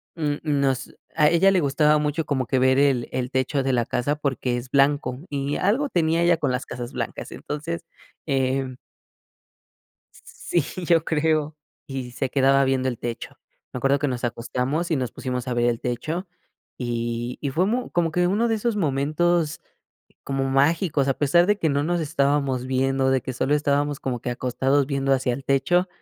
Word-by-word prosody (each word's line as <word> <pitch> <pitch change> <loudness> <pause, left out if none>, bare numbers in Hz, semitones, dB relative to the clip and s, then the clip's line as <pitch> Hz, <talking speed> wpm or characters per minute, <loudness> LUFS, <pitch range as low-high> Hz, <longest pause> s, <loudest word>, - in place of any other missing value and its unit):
mm, 150 -3 -1
nos 140 -4 0 0.2
a 150 -2 +5
ella 175 +4 +4
le 185 -3 +3
gustaba 150 +2 +3
mucho 150 +2 -1
como 130 -3 -1
que 130 +2 +1
ver 130 0 +4
el 135 -4 +2
el 125 0 -2
techo 130 +1 0
de 135 - +1
la 120 -2 +1
casa 135 +4 -1
porque 130 -4 -1
es 120 +1 -7
blanco 140 -2 +2
y 140 0 -2
algo 235 +10 +1
tenía 165 -3 +1
ella 170 0 +5
con 135 - 0
las 125 +1 -2
casas 120 0 -6
blancas. - - -5
Entonces, 160 +3 -5 0.4
em 135 -2 0 1.4
Sí, 170 -4 -3 0.2
yo 165 -2 +3
creo. 155 -1 0 0.3
Y 130 -2 -5
se 130 - -2
quedaba 135 0 +4
viendo 130 -1 +1
el 120 -3 -3
techo. 120 -1 -6 0.3
Me - - -4
acuerdo 135 +3 +2
que 145 - 0
nos 125 -1 -3
acostamos 125 +8 -2
y 160 - +2
nos 125 -4 -2
pusimos 125 -1 -4
a 125 - -1
ver 120 0 +2
el 120 -1 0
techo 155 +9 -3 0.5
y 120 0 -3
y 140 - -2
fue 170 +7 +1
mu 245 +4 -1
como 170 -2 +1
que 175 +2 +1
uno 210 +6 +1
de 225 - +2
esos 225 0 -1
momentos 155 +1 +1 0.6
como 135 -1 -1
mágicos, 145 +1 +2
a 135 - +3
pesar 150 +4 +4
de 210 +2 +2
que 165 -6 0
no 145 0 +1
nos 175 +1 0
estábamos 140 -4 0
viendo, 130 +1 +1
de 130 -2 +2
que 130 - -5
solo 140 +4 +1
estábamos 145 -1 0
como 125 -2 -3
que 125 - -4
acostados 130 +3 +1
viendo 135 -1 -1
hacia 130 -2 0
el 135 - -6
techo 175 +7 +2
140 Hz, 185 wpm, -24 LUFS, 130-160 Hz, 1.4 s, a